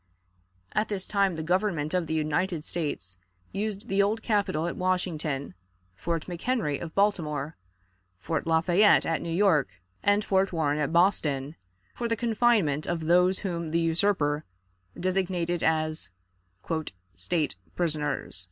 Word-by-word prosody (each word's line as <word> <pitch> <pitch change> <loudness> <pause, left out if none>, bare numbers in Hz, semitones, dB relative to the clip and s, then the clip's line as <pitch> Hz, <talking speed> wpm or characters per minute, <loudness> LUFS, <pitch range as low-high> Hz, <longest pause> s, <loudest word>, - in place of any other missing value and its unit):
At 215 - 0
this 195 -3 -2
time 200 -3 +1
the 160 - -4
Government 175 -3 0
of 180 -3 0
the 160 - -1
United 155 +2 0
States 145 - -4 0.3
used 205 0 -3
the 195 +1 +2
Old 215 +3 0
Capitol 200 -8 +1
at 170 - -2
Washington, 165 - -1 0.4
Fort 165 - -3
McHenry 180 - -1
of 165 -2 -7
Baltimore, 160 -7 0 0.6
Fort 160 - -3
Lafayette 170 +5 +4
at 165 - 0
New 170 - -5
York, 165 - +2 0.2
and 205 +1 +2
Fort 190 0 +2
Warren 150 -3 0
at 150 -1 0
Boston, 155 -5 +2 0.4
for 235 - -3
the 230 - +1
confinement 220 - +2
of 170 -1 -1
those 180 +3 +3
whom 170 -3 -2
the 165 +2 +1
usurper 165 -3 +1 0.6
designated 180 -2 0
as 155 -3 0 1.0
"state 155 - -1 0.2
prisoners." 150 - -1
170 Hz, 135 wpm, -27 LUFS, 155-195 Hz, 1.0 s, Lafayette